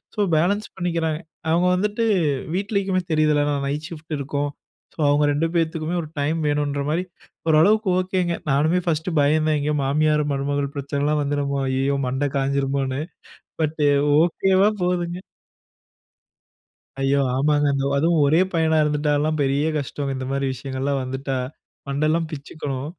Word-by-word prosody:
So, - - -7 0.2
balance 200 +7 +1
பண்ணிக்கிறாங்க. 165 -3 -1 0.3
அவங்க 170 +2 +3
வந்துட்டு, 210 +4 0 0.5
வீட்லேக்குமே 195 -1 0
தெரியுதுல்ல, 155 -1 +3
நான் 140 -1 -1
நைட் 150 +2 -3
ஷிஃப்ட் 155 -1 -6
இருக்கும். 145 +1 -2 0.5
சோ, - - -21
அவுங்க 145 +1 +3
2 160 +3 +1
பேத்துக்குமே 165 0 0
ஒரு 150 - -9
டைம் 150 +3 0
வேணுன்ற 145 -1 0
மாரி, 165 +4 0 0.5
ஓரளவுக்கு 200 +7 +4
ஓகேங்க. 185 -2 0 0.2
நானுமே 155 +6 +2
ஃபர்ஸ்ட்டு 160 +1 -1
பயந்தேன். 155 +1 +2
எங்கயோ, 150 +1 0
மாமியார் 150 +2 +2
மருமகள் 140 0 -2
பிரச்சனலாம் 145 +2 0
வந்துருமோ, 140 -1 -1
ஐயயோ 135 +1 0
மண்ட 135 +3 0
காஞ்சிருமோன்னு. 135 0 0 0.6
பட், 155 +1 -2 0.4
ஓகேவா 190 +4 +3
போதுங்க. 175 -1 -1 1.8
ஐயோ! 135 +1 +2 0.2
ஆமாங்க. 145 +1 +2
அந் 135 0 -1
அதுவும் 165 +2 +2
ஒரே 155 +4 +4
பையனா 160 -1 +2
இருந்துட்டாலா, 150 0 +1
பெரிய 140 +2 +1
கஷ்டம். 140 -1 -3
இந்த 130 0 -4
மாரி 140 0 -1
விஷயங்கள்லா 135 +2 -3
வந்துட்டா. 135 +1 -3 0.5
மண்டல்லாம் 155 +4 0
பிச்சுக்கும். 140 -2 -5
150 Hz, 130 wpm, -22 LUFS, 140-165 Hz, 1.8 s, ஓரளவுக்கு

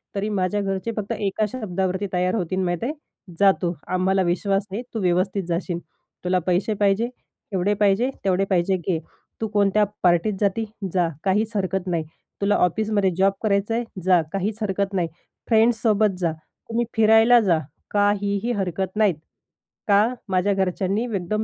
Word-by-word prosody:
तरी 205 +2 -1
माझ्या 205 0 0
घरचे 195 +3 -2
फक्त 205 -1 -3
1 205 +1 0
शब्दावरती 190 -4 -2
तयार 180 +3 +1
होतील 185 -1 -1
माहीत 175 +2 -2
आहे 285 +5 -1 0.5
जा 200 -1 +7
तू 175 -1 0 0.2
आम्हाला 190 +1 +2
विश्वास 195 +3 0
आहे 215 +5 -3
तू 225 - -2
व्यवस्थित 185 +2 +1
जाशील. 170 0 -2 0.4
तुला 180 0 +2
पैसे 185 +4 +1
पाहिजे 205 +3 +1 0.4
एवढे 190 +3 +1
पाहिजे 205 +5 +2 0.2
तेवढे 190 +1 +2
पाहिजे 185 +1 +2
घे. 170 -1 -1 0.4
तू 220 - 0
कोणत्या 205 0 +2 0.2
पार्टीत 175 +4 +3
जाती 210 +2 +1 0.3
जा. 175 -2 +2 0.2
काहीच 210 +3 +1
हरकत 190 -1 -1
नाही. 170 -3 0 0.4
तुला 200 +1 +3
ऑफिसमध्ये 205 +1 +1
जॉब 195 +1 +3
करायचंय? 215 +3 +1 0.2
जा 180 -2 +4
काहीच 200 +3 -1
हरकत 200 0 -1
नाही. 175 -3 +1 0.4
फ्रेंड्स 225 0 +3
सोबत 210 -4 +2
जा. 170 -3 +1 0.4
तुम्ही 235 +1 0
फिरायला 225 +2 +6
जा. 175 -7 +2 0.3
काहीही 205 +2 +1
हरकत 190 -2 -2
नाहीत. 210 -6 +3 0.7
का? 210 +4 +4 0.2
माझ्या 190 +2 +2
घरच्यांनी 195 +3 0
एकदम 215 -1 -2
195 Hz, 155 wpm, -23 LUFS, 185-215 Hz, 0.7 s, जा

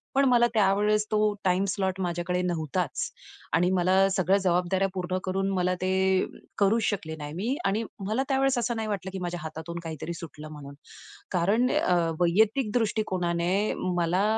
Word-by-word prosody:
पण 275 +1 +4
मला 240 -1 +5
त्यावेळेस 210 0 +3
तो 215 - +2 0.3
टाईम 185 +1 +2
स्लॉट 190 -1 -1
माझ्याकडे 175 0 -1
नव्हताच 165 -6 -2 0.5
आणि 175 +2 +3
मला 190 +1 +4
सगळ्या 190 0 +2
जबाबदाऱ्या 180 +1 +2
पूर्ण 185 -1 -2
करून 195 +1 -1
मला 180 -1 +1
ते 190 0 +2 0.3
करूच 215 +3 +3
शकले 180 -7 -2
नाही 145 -1 -7
मी. 220 - -1
आणि 210 +3 +1 0.2
मला 220 +6 +1
त्या 270 - +2
वेळेस 270 -1 +2
असं 235 0 -1
नाही 220 -1 -2
वाटलं, 190 -2 -3
की 190 - -4
माझ्या 175 0 -3
हातातून 160 +2 -6
काहीतरी 160 0 -5
सुटलं 155 -3 -9
म्हणून 145 -2 -9 0.6
कारण 205 +8 +2
अ, 180 - +2 0.3
वैयक्तिक 210 +7 +3
दृष्टिकोनाने 190 -4 0 0.2
मला 175 +3 +2
185 Hz, 160 wpm, -27 LUFS, 175-210 Hz, 0.6 s, मला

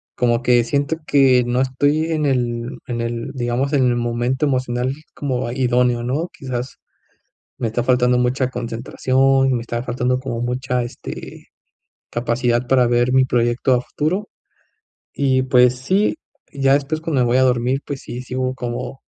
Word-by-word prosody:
Como 120 0 +1
que 120 -1 +4
siento 140 +5 -1
que 130 -3 +5
no 125 +1 +1
estoy 145 +5 +1
en 155 -1 0
el 120 -3 -1
en 120 -1 -3
el, 115 +2 -3
digamos, 130 +2 -1
en 135 -3 +3
el 120 - +2
momento 120 +3 0
emocional 130 -2 -1 0.2
como 130 -4 -2
idóneo, 125 -1 +1
¿no? 140 +8 -1
Quizás, 130 -1 -5 0.8
me 115 - -1
está 115 +2 -1
faltando 125 0 +3
mucha 125 +1 +1
concentración 130 +3 +1
y - - +2
me 120 - -1
está 120 0 -4
faltando 125 +1 -1
como 125 -3 -4
mucha, 125 0 -1
este, 120 - -9 0.6
capacidad 120 +1 0
para 125 -2 +4
ver 120 +1 +2
mi 130 0 +5
proyecto 120 +1 +1
a 125 - 0
futuro. 180 +11 -2 0.9
Y 130 -2 +1
pues 125 -1 +4
sí, 190 - +1 0.4
ya 135 -1 +2
después, 145 +2 -1
cuando 160 -5 0
me - - +2
voy 120 +2 +2
a 130 - +4
dormir, 125 +1 +1
pues 140 -2 -5
sí, 120 +1 -6
sigo 130 0 -2
como 125 +1 -5
125 Hz, 165 wpm, -20 LUFS, 120-135 Hz, 0.9 s, que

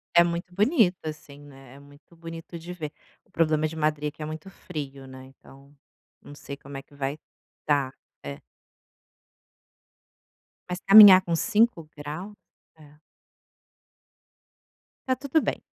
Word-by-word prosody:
É 170 - +8
muito 170 +1 -4
bonito 210 - +3
assim, 150 -2 -8
né, 135 -3 -15
é - - -14
muito 145 +4 -19
bonito 165 0 -9
de 170 +2 -9
ver, 160 -4 -6 0.3
o - - -33
problema 155 -1 +1
de 160 - -9
Madrid 150 -1 -1
que 155 - -14
é - - -3
muito 155 +3 -8
frio, 140 -8 -8
né, 130 0 -12
então, 135 +1 -19 0.5
não 145 - -13
sei 140 - -8
como 140 0 -10
é 135 - -8
que 145 - -25
vai, 140 +1 -4 0.5
estar, 140 -3 +1 0.3
é. 70 0 -7 2.3
Mas 180 0 -4
caminhar 200 -2 +10
com 170 -2 -2
5 205 -3 +1
graus? 155 +8 -7 0.4
É. 150 -1 -18 2.1
Está 260 - +2
tudo 285 +3 +1
bem. - - -3
155 Hz, 140 wpm, -26 LUFS, 140-175 Hz, 2.3 s, caminhar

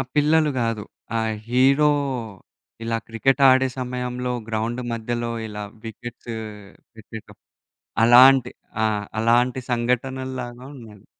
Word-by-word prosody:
పిల్లలు 150 +1 +3
గాదు. 115 -2 -1 0.3
ఆ - - +1 0.3
హీరో 135 +4 +4 0.9
ఇలా 115 0 -1
క్రికెట్ 130 +4 +1
ఆడే 130 0 +4
సమయంలో 125 0 -3 0.2
గ్రౌండ్ 115 +2 -2
మధ్యలో 120 +1 -3 0.2
ఇలా 105 -1 -6 0.2
వికెట్స్ 120 +1 -8 0.6
పెట్టేటప్పుడు, 110 0 -12 0.6
అలాంటి 125 +1 +7 0.3
ఆ! - - +4 0.3
అలాంటి 120 +3 +2
సంఘటనల్లాగా 125 +1 -2
ఉన్నయి. 110 -5 -14
120 Hz, 95 wpm, -23 LUFS, 115-130 Hz, 0.9 s, అలాంటి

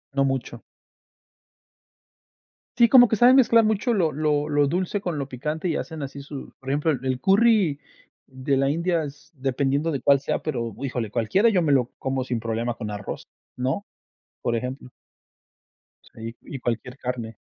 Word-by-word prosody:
No 140 - +3
mucho. 130 -3 -3 2.2
Sí, 235 -1 +6
como 245 0 +8
que 220 - +1
saben 245 +4 +6
mezclar 230 -3 +5
mucho 215 +3 +1
lo 180 -8 +2
lo 150 0 0
lo 145 -1 +3
dulce 185 +6 -1
con 175 -5 -3
lo 140 -2 -3
picante 150 +7 -4
y 165 - 0
hacen 160 -3 -5
así 140 +1 -7
su 140 -1 -9
Por 135 - -8
ejemplo, 145 +3 +1
el 130 -4 -3
el 130 -1 -1
curry 195 - +3 0.5
de 130 +1 -2
la 135 +1 +2
India 170 +2 0
es 145 0 -10
dependiendo 140 +2 0
de 140 - -2
cuál 140 +2 +4
sea, 140 - -3
pero 120 -7 -3
híjole, 125 -5 -3
cualquiera 120 - +2
yo 185 -5 +2
me 150 - +2
lo 125 -3 +3
como 130 -1 -2
sin 125 -2 -2
problema 115 +1 -2
con 110 -3 -5
arroz, 105 -1 -6 0.3
¿no? 130 +11 -2 0.5
Por 120 - 0
ejemplo. 125 +2 -5 1.2
Sí, 115 +1 -8
y 135 - -8
cualquier 125 +2 -3
carne. 120 -4 -5
140 Hz, 170 wpm, -24 LUFS, 125-165 Hz, 2.2 s, como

